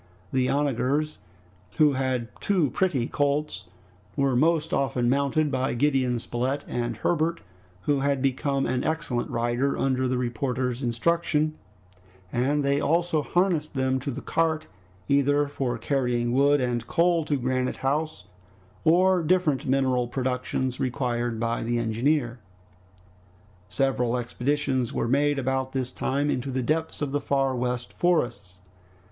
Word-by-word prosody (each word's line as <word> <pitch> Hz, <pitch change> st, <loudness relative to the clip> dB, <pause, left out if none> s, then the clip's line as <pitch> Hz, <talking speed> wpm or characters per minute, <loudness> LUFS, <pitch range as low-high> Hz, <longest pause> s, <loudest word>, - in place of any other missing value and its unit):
The 130 Hz, -1 st, +2 dB
onagers, 145 Hz, +2 st, 0 dB, 0.6 s
who 150 Hz, -2 st, +5 dB
had 130 Hz, -3 st, -1 dB
two 180 Hz, -10 st, +1 dB
pretty 155 Hz, -9 st, +1 dB
colts, 145 Hz, +3 st, -1 dB, 0.5 s
were 140 Hz, -2 st, +1 dB
most 160 Hz, +4 st, +2 dB
often 125 Hz, -3 st, +1 dB
mounted 140 Hz, +2 st, +1 dB
by 130 Hz, -1 st, 0 dB
Gideon 130 Hz, -2 st, +2 dB
Spilett 125 Hz, +4 st, -2 dB
and 120 Hz, -1 st, -2 dB
Herbert, 165 Hz, 0 st, 0 dB, 0.4 s
who 145 Hz, +7 st, +1 dB
had 140 Hz, 0 st, +1 dB
become 135 Hz, +1 st, 0 dB
an 130 Hz, 0 st, -1 dB
excellent 150 Hz, -6 st, -2 dB
rider 120 Hz, +4 st, 0 dB
under 130 Hz, -1 st, +1 dB
the 130 Hz, 0 st, 0 dB
reporter's 125 Hz, +1 st, -2 dB
instruction, 155 Hz, +5 st, +1 dB, 0.8 s
and 140 Hz, +4 st, +1 dB
they 140 Hz, +1 st, +2 dB
also 165 Hz, +1 st, +1 dB
harnessed 170 Hz, -2 st, 0 dB
them 130 Hz, 0 st, +1 dB
to 135 Hz, -, -4 dB
the 130 Hz, -, -5 dB
cart 160 Hz, -1 st, 0 dB, 0.4 s
either 145 Hz, +1 st, +3 dB
for 130 Hz, -4 st, -2 dB
carrying 120 Hz, -1 st, 0 dB
wood 140 Hz, +2 st, +4 dB
and 120 Hz, -2 st, -1 dB
coal 170 Hz, -1 st, +2 dB
to 145 Hz, -2 st, 0 dB
Granite 130 Hz, 0 st, -1 dB
House, 155 Hz, +3 st, -1 dB, 0.6 s
or 180 Hz, +3 st, +4 dB
different 165 Hz, -5 st, +1 dB
mineral 130 Hz, -2 st, +2 dB
productions 130 Hz, 0 st, -2 dB
required 120 Hz, -3 st, -1 dB
by 115 Hz, 0 st, -1 dB
the 120 Hz, +1 st, -1 dB
engineer. 120 Hz, +2 st, 0 dB, 1.3 s
Several 125 Hz, 0 st, +1 dB
expeditions 130 Hz, +1 st, -1 dB
were -, -, -1 dB
made 145 Hz, +3 st, +2 dB
about 130 Hz, 0 st, -1 dB
this 130 Hz, -2 st, -2 dB
time 145 Hz, +2 st, -1 dB
into 130 Hz, +2 st, -2 dB
the 130 Hz, -1 st, -1 dB
depths 160 Hz, +3 st, -1 dB
of 140 Hz, -, -2 dB
the 145 Hz, 0 st, -1 dB
Far 135 Hz, -2 st, +1 dB
West 125 Hz, 0 st, -3 dB
Forests. 120 Hz, -, 0 dB
135 Hz, 135 wpm, -26 LUFS, 125-150 Hz, 1.3 s, who